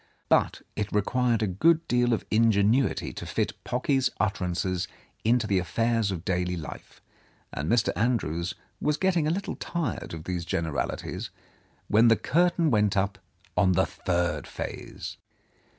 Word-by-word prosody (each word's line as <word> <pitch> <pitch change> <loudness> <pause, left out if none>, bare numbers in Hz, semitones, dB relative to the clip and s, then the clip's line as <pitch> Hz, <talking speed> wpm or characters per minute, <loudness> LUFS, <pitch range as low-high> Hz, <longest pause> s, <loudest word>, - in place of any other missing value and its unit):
Bu't - - +3
it 105 -1 -2
required 115 +2 +1
a - - +1
good 165 - +3
deal 120 0 +2
of 115 - 0
ingenuity 110 +3 +3
to - - -7
fit - - -1
Pocky's 130 +1 +1
utterances 90 -3 -1 0.4
into 115 0 +3
the 100 -3 +2
affairs 115 +5 +1
of 90 -3 -4
daily 90 -1 0
life, 80 - -9 0.5
and 75 +3 -3
Mr. 115 -2 +2
Andrews 90 -8 0 0.3
was 150 0 +1
getting 175 -3 +2
a - - +2
little 195 +4 -2
tired 165 - -3
of 80 - -8
these 90 -1 -3
generalities, 85 -4 -3 0.6
when 110 +3 +5
the 115 - +6
curtain 170 0 +2
went 105 -2 +2
up 100 +1 0 0.4
on 95 -2 +4
the - - +3
third 90 -1 -1
phase. - - -6
110 Hz, 145 wpm, -27 LUFS, 90-125 Hz, 0.6 s, the